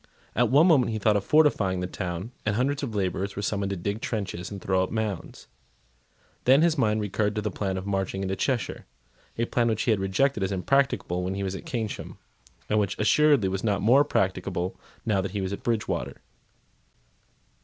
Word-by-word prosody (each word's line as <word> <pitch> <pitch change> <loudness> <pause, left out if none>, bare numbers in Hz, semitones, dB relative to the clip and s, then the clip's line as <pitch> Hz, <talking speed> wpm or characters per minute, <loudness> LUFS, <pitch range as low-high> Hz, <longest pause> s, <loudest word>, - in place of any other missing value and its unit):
At 120 -1 +3
one 145 +5 +6
moment 140 -10 +4
he 110 - -2
thought 105 0 +2
of 100 - +1
fortifying 110 -10 +3
the 90 - -2
town; 90 +3 -5
and 105 -1 0
hundreds 135 +4 0
of 120 -6 -4
labourers 95 0 -1
were 100 - -4
summoned 100 -1 -1
to 100 - -2
dig 100 +5 -3
trenches 100 -6 -3
and 100 - -7
throw 95 -1 +1
up 95 - -1
mounds. 110 -5 -4 1.0
Then 135 +5 +6
his 170 -2 +3
mind 110 -6 +1
recurred 105 +1 -1
to 105 - -1
the 105 - -1
plan 95 -1 -2
of 95 - -5
marching 95 -1 -2
into 95 0 -1
Cheshire, 125 +1 -2 0.5
a 115 - +1
plan 120 0 +1
which 110 -2 0
he 120 - +2
had 105 - +2
rejected 105 +6 +1
as 95 +1 0
impracticable 100 -3 +1
when 95 +1 -2
he 100 - -3
was 95 0 -3
at - - -8
Keynsham, 115 -4 -4 0.5
and 105 - +2
which 100 -1 -1
assuredly 140 0 +4
was 95 0 -3
not 105 -4 0
more 130 +6 +6
practicable 95 -6 -1 0.3
now 105 -4 +2
that 95 0 -5
he 100 - -2
was 95 +1 -2
at - - -6
Bridgewater. 115 -3 -2
105 Hz, 200 wpm, -26 LUFS, 95-115 Hz, 1.0 s, one